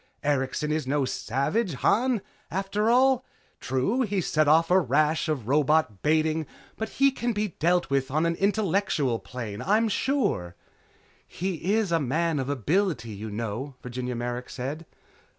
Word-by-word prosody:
Erikson 145 +1 0
is 155 -3 -1
no 140 0 +1
savage, 140 - -1
Han, 230 - +1 0.3
after 195 +4 0
all. 255 +1 +4 0.4
True 135 - 0
he's 200 -7 0
set 155 -1 +2
off 165 +3 +4
a 185 - +6
rash 155 +2 +1
of 135 -8 -2
robot 145 -6 +2
baiting, 155 0 +1 0.3
but 220 0 -4
he 275 0 +5
can 240 -2 -2
be 210 0 -1
dealt 175 -1 +2
with 135 -1 +1
on 155 +4 +1
an 170 0 +1
intelligent 195 - +1
plane, 115 -5 -6
I'm 215 +4 +2
sure." 215 - 0 0.7
"He 185 0 -3
is 220 -5 0
a 165 - +3
man 155 +3 0
of 130 0 -3
ability, 145 - 0
you 105 +2 -6
know," 115 +6 -4
Virginia 125 0 -4
Merrick 120 +1 -4
said. 145 +6 -5
155 Hz, 150 wpm, -26 LUFS, 130-195 Hz, 0.7 s, a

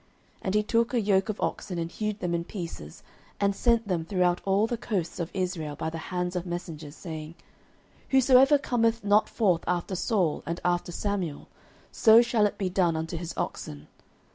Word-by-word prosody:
09:011:007 - - -35
And 190 +1 -2
he 210 - +3
took 230 +3 +1
a - - +3
yoke 200 -1 +2
of 215 - -3
oxen, 180 -3 -3
and 165 0 -3
hewed 215 -1 -3
them 175 -1 -1
in 170 0 0
pieces, 170 - -8 0.4
and 200 -1 +2
sent 230 0 +2
them 175 -4 0
throughout 180 0 +1
all 195 +2 +3
the 240 - -2
coasts 195 -8 -3
of 170 -1 -2
Israel 180 -6 -3
by 160 +2 -3
the 165 - -5
hands 180 0 -2
of 180 - -1
messengers, 160 -4 -6
saying, 160 -2 -7 0.7
Whosoever 265 +2 +6
cometh 230 -4 0
not 205 +1 +3
forth 185 -7 +1
after 180 +2 -1
Saul 185 -4 0
and 170 +2 -2
after 175 0 0
Samuel, 185 -6 -3 0.4
so 225 +1 +6
shall 235 -3 +2
it - - -7
be 195 - -1
done 180 -2 +1
unto 160 +2 -3
his 170 0 -5
oxen. 75 0 -5
185 Hz, 190 wpm, -27 LUFS, 170-215 Hz, 0.7 s, Whosoever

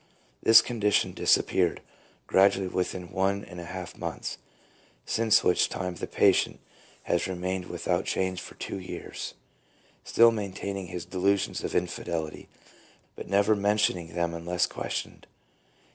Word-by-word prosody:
This 115 0 +8
condition 105 -4 +1
disappeared 90 -3 +2 0.5
gradually, 95 0 +4
within 90 -1 -3
one 100 +1 0
and 90 - -10
a 85 - -7
half 90 0 -7
months, - - -5 0.7
since 110 -1 +3
which 90 - +3
time 90 -1 -3
the - - -6
patient - - +3 0.4
has 85 +2 0
re 95 - -3
mained 90 +1 -3
without - - -1
change 95 -1 -1
for - - -10
two - - -5
years, 90 - -7 0.7
still 115 0 +5
maintain 100 -2 -4
ing 95 -2 -5
his 90 -1 -6
delusions 100 +2 0
of - - -3
infidelity, 85 -3 -3 0.7
but - - -8
never 100 +2 +4
mentioning 100 -5 +1
them 85 -1 0
unless 85 +2 0
questioned. - - -5
95 Hz, 135 wpm, -28 LUFS, 90-100 Hz, 0.7 s, This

